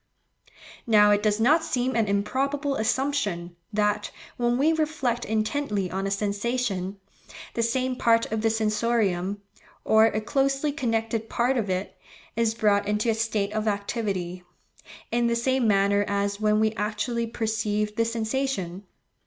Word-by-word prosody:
Now 210 -2 +6
it 205 0 +3
does 210 0 +1
not 305 +8 +4
seem 255 -4 -1
an 225 -2 +2
improbable 275 +8 0
assumption, 220 -8 -1 0.2
that, 210 0 0 0.3
when 240 0 +1
we 305 +5 +3
reflect 300 -7 -1
intently 215 -3 -1
on 195 +1 -2
a - - -1
sensation, 200 -1 -2 0.5
the 230 - -1
same 255 +2 0
part 230 -2 +3
of 220 -1 -1
the 225 - +2
sensorium, 210 -3 0 0.4
or 220 0 +6
a 215 - -1
closely 275 +4 0
connected 225 -5 -2
part 245 +3 +1
of 220 -5 -1
it, 185 +1 -2 0.4
is 225 -1 +1
brought 205 -2 +2
into 210 +2 +1
a - - +1
state 215 -2 -1
of 215 0 -1
activity, 200 -4 -2 0.7
in 235 0 +2
the 235 - +1
same 260 +1 +1
manner 200 0 +3
as 200 0 -1
when 215 0 +2
we 220 0 +2
actually 230 +2 -2
perceive 215 -2 -1
the 230 - +2
sensation. 225 -5 -2
220 Hz, 145 wpm, -26 LUFS, 205-240 Hz, 0.7 s, Now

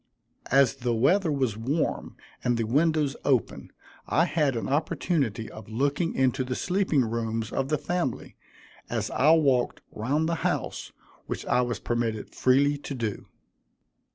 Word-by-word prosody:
As 135 -2 +4
the 120 -1 -1
weather 160 - +3
was 130 -7 0
warm 135 +9 -2 0.3
and 120 -1 +1
the 115 - 0
windows 150 +4 +1
open, 130 -5 0 0.4
I 165 +4 +3
had 150 -7 +1
an 115 - -2
opportunity 140 - 0
of 110 -1 -11
looking 145 +8 0
into 130 0 +2
the 125 0 -3
sleeping 180 -8 +1
rooms 115 -1 -2
of 135 0 -1
the 150 - +2
family, 175 -3 -3 0.5
as - - -2
I 145 - +3
walked 135 -6 +2
round 145 +9 0
the 165 -1 -2
house, - - -2 0.4
which - - -4
I 125 - +2
was 120 -1 -2
permitted 115 -3 -2
freely 140 +3 +3
to 140 - -6
do. 115 -5 -4
135 Hz, 150 wpm, -27 LUFS, 115-150 Hz, 0.5 s, As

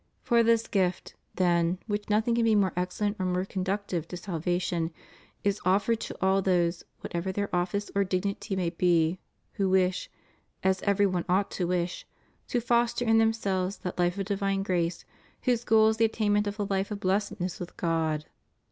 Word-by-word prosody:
For 235 -2 +4
this 230 0 +3
gift, 185 -3 0 0.2
than 175 -1 +2
which 205 -1 -3
nothing 220 +3 +2
can 235 0 +2
be 225 -1 +4
more 195 -4 +2
excellent 205 +4 -1
or 185 - 0
more 180 +1 0
conductive 190 -3 -2
to 180 - -6
salvation, 175 -1 -1 0.5
is 200 0 0
offered 200 +5 +2
to - - -6
all 190 +1 +3
those, 175 -2 +1 0.2
whatever 175 +2 -3
their 200 0 -2
office 180 +4 -1
or 200 - +3
dignity 195 +2 -2
may 180 -3 -1
be, 170 0 +2 0.3
who 195 -1 0
wish 185 -1 +1 0.3
— - - -43
as 190 0 +2
every 200 0 +3
one 185 -3 0
ought 195 +2 +2
to 180 - -2
wish 175 0 -2 0.2
— - - -39
to 245 - 0
foster 240 0 +1
in 225 -1 +4
themselves 200 -4 0
that 180 - -5
Ufe 175 +1 +1
of 195 - -2
divine 195 -1 0
grace 175 -3 -1 0.4
whose 245 -2 +1
goal 220 0 +5
is 220 - -1
the 225 - +4
attainment 210 -2 +1
of 205 0 -4
the 205 - -1
life 195 -1 -1
of 210 -2 -4
blessedness 190 -1 -1
with 180 - -8
God. 160 -3 0
190 Hz, 185 wpm, -28 LUFS, 180-205 Hz, 0.5 s, goal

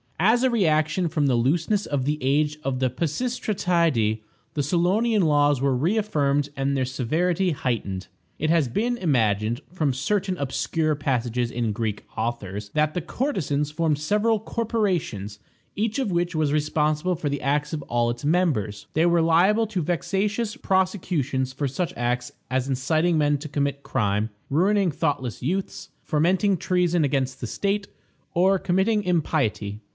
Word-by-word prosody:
As 230 +5 +4
a 260 - +4
reaction 165 -5 +2
from 150 -2 0
the 130 -3 +3
looseness 165 - +1
of 140 -3 -1
the 150 +2 0
age 150 +3 +1
of 130 -1 -1
the 130 -1 +2
Pisistratidæ, 170 - 0 0.3
the 145 - 0
Solonian 190 - +2
laws 145 -3 +3
were 135 -1 +2
reaffirmed 145 - +1
and 135 +1 0
their 130 - +1
severity 165 +9 0
heightened. 110 - -3 0.3
It 155 - 0
has 165 -4 +3
been 235 - -1
imagined, 115 - +1
from 155 -7 0
certain 185 +7 -1
obscure 155 +3 -1
passages 125 -4 -1
in 115 -2 -1
Greek 105 -1 -3
authors, 105 -3 -3
that 150 +5 +1
the 180 - -2
courtesans 155 - -1
formed 155 -1 +1
several 210 +7 +1
corporations, 185 - -2 0.4
each 220 +4 -1
of 255 -7 -1
which 175 0 0
was 155 -2 +1
responsible 155 +3 +1
for 155 -3 -2
the 145 0 -3
acts 145 +2 0
of 155 - -2
all 120 0 0
its 120 +3 -4
members. 145 - 0
They 160 +2 +3
were 170 -1 +3
liable 185 +7 +4
to 200 -4 -2
vexatious 205 - -1
prosecutions 180 - 0
for 140 +2 -2
such 165 +7 -2
acts 125 +1 -1 0.2
as 130 0 0
inciting 155 +6 +1
men 145 -1 +2
to 155 +1 -7
commit 140 -1 -1
crime, 105 +1 0 0.2
ruining 190 +5 +2
thoughtless 140 -7 -2
youths, 185 +8 -3
fomenting 185 +6 +2
treason 175 -2 +1
against 135 -2 -1
the 120 - -3
state, 200 - -1 0.5
or 190 +2 +4
committing 190 +4 +1
impiety. 140 - 0
155 Hz, 150 wpm, -24 LUFS, 130-185 Hz, 0.5 s, As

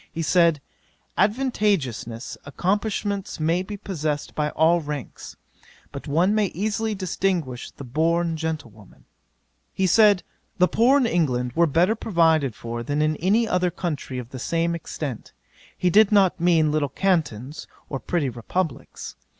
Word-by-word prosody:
He 165 - -3
said, 165 -3 +3 0.5
"adventitious 195 - 0
accomplishments 200 +5 -2
may 165 +3 +1
be 205 +2 -6
possessed 155 -7 -3
by 150 -1 -1
all 165 +3 +3
ranks; 145 -4 -7 0.5
but 140 - -8
one 170 +8 +2
may 215 -2 +2
easily 215 +3 -1
distinguish 180 -8 -2
the - - -11
born 165 +5 0
gentlewoman." 150 - -6 0.7
'He 190 - 0
said, 205 0 +5 0.3
"the 180 -1 +4
poor 245 +10 +4
in 270 - +2
England 125 - 0
were 170 +3 +3
better 170 +8 +3
provided 160 - +2
for, 120 0 -5
than 145 +5 -2
in 155 0 +2
any 210 +7 +2
other 180 -2 +1
country 160 -7 -4
of 125 0 -7
the 130 - -7
same 170 +5 0
extent: 150 -6 -6 0.4
he 180 - +1
did 215 +2 +5
not 195 -3 +4
mean 165 -3 +3
little 150 -2 0
Cantons, 150 - -1 0.2
or 135 - -4
petty 160 +2 -1
Republicks. 140 +7 -4
165 Hz, 140 wpm, -24 LUFS, 145-190 Hz, 0.7 s, said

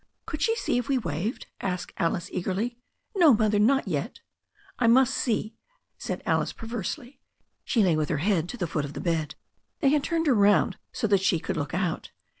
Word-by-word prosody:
Could 300 -1 -5
she 455 - +2
see 245 - 0
if 245 - -5
we 275 - +3
waved?" 180 - -3 0.2
asked 180 -2 -3
Alice 170 +1 0
eagerly. 195 +6 -2 0.4
No, 330 - +7
Mother, 215 -1 +2
not 270 +6 +3
yet." - - -3 0.6
I 240 - +3
must 255 +2 +5
see," 220 -2 -1 0.5
said - - -4
Alice - - +1
perversely. 240 - -6 0.4
She 225 - +2
lay 175 -4 +3
with 155 -1 -1
her 155 - 0
head 175 +1 +1
to 245 - -6
the 185 - -1
foot 150 -2 -2
of 140 0 -6
the - - -6
bed. 160 -4 -1 0.4
They 280 - +3
had 290 0 +2
turned 330 +2 0
her 285 - +4
round 205 -2 +3
so 245 - -2
that 200 -3 +3
she 190 -3 +3
could 190 - -3
look 150 0 -3
out. 180 -3 -2
210 Hz, 200 wpm, -27 LUFS, 175-250 Hz, 0.6 s, No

